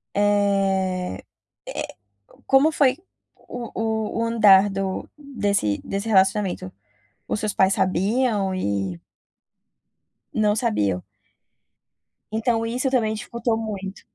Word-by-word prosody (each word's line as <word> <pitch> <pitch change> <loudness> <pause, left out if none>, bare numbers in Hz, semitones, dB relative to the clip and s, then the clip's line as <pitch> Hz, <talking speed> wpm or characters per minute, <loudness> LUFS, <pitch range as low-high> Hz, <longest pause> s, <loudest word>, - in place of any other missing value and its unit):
eh 195 - +1 0.5
eh, - - -5 0.5
como 275 +4 +4
foi 275 -4 +3 0.4
o 240 -2 -8
o 220 0 -2
o 230 - +1
andar 205 -4 +7
do 195 -1 -3
desse 205 - -1
desse 200 +3 -4
relacionamento? 190 - +2 0.6
Os - - -1
seus 215 -2 -1
pais 190 0 +3
sabiam 200 +2 +1
e 100 - -2 1.3
Não 210 -1 +2
sabiam. 105 - 0 1.3
Então 225 +1 0
isso 250 +4 -1
também 230 -5 +1
dificultou 230 +1 -2
muito? 200 -3 -5
205 Hz, 100 wpm, -23 LUFS, 190-230 Hz, 1.3 s, andar